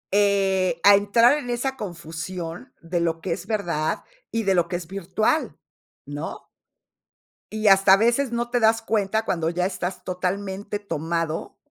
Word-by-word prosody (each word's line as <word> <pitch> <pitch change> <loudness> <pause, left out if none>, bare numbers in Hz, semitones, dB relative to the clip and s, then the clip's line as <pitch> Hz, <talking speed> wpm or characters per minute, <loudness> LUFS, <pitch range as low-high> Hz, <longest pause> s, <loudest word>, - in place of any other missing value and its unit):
Eh, 195 -4 +2
a 205 - +9
entrar 230 +7 +4
en 245 - -7
esa 245 +3 -1
confusión 175 +1 -6
de 170 +1 -2
lo 165 -1 0
que 175 +2 -4
es - - -7
verdad 170 -7 -1 0.3
y 230 - -1
de 195 -2 +2
lo 175 -2 +2
que 175 - -4
es 175 -1 -4
virtual, 195 - -1 0.5
¿no? 145 +2 -7 1.0
Y 215 0 -1
hasta 195 -1 +7
a - - +7
veces 235 +4 +2
no 235 0 -2
te 245 0 +1
das 225 0 +3
cuenta 220 -1 0
cuando 165 -5 0
ya 180 +1 -1
estás 185 -1 -4
totalmente 195 +2 -3
tomado, 165 -4 -3
195 Hz, 160 wpm, -24 LUFS, 170-220 Hz, 1.0 s, a